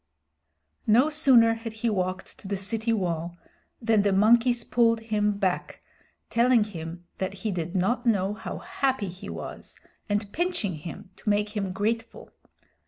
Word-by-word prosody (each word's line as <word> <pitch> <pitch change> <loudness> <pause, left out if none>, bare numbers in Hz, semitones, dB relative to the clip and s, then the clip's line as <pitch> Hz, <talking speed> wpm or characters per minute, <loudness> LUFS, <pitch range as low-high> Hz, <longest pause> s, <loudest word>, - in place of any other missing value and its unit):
No 250 +8 +5
sooner 255 -7 +5
had 225 0 -6
he 220 +1 -1
walked 185 -1 -3
to - - -10
the 200 0 -1
city 220 +4 -1
wall 175 -5 -1 0.4
than 225 -3 +3
the 200 0 +2
monkeys 235 +4 +4
pulled 230 -1 +3
him 210 -2 0
back, 190 -3 -2 0.5
telling 235 -1 +4
him 175 -3 -7
that 190 +1 -2
he 215 - +1
did 175 0 -4
not 190 +7 +1
know 200 -4 +2
how 220 - -6
happy 270 - -1
he 180 +2 -9
was, - - -8 0.3
and 205 0 -1
pinching 345 - -1
him 165 +4 -8
to - - -3
make 210 +1 +1
him 195 -3 -1
grateful. 225 +4 -3
210 Hz, 155 wpm, -27 LUFS, 190-230 Hz, 0.5 s, No